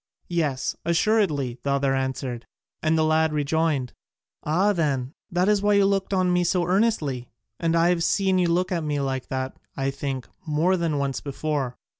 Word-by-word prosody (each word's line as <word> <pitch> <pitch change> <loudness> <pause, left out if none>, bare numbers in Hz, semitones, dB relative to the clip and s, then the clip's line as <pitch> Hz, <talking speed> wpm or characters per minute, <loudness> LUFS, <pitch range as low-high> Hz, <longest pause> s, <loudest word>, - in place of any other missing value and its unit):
"Yes, 150 -6 0
assuredly," 165 - +1
the 140 - -3
other 140 -1 +2
answered, 130 -2 -3 0.3
and 160 0 +2
the 160 - +3
lad 160 0 +3
rejoined, 150 -3 0 0.5
"Ah, 185 +7 +2
then, 140 -6 -1 0.2
that 180 +2 +1
is 210 -1 +3
why 205 0 +3
you 200 -1 +5
looked 195 0 0
at 190 -1 +2
me 180 -1 +2
so 175 +1 +1
earnestly; 170 - 0 0.3
and 165 0 +1
I 165 +1 +4
have 175 -2 +1
seen 190 +1 +2
you 180 - +3
look 180 +2 +1
at 170 -3 0
me 150 -1 -1
like 135 -2 -2
that, 130 0 -3 0.2
I 135 0 0
think, 135 -2 -4 0.2
more 165 +3 +2
than 165 -4 0
once 140 -1 -1
before." 140 -2 -3
155 Hz, 180 wpm, -25 LUFS, 135-180 Hz, 0.5 s, you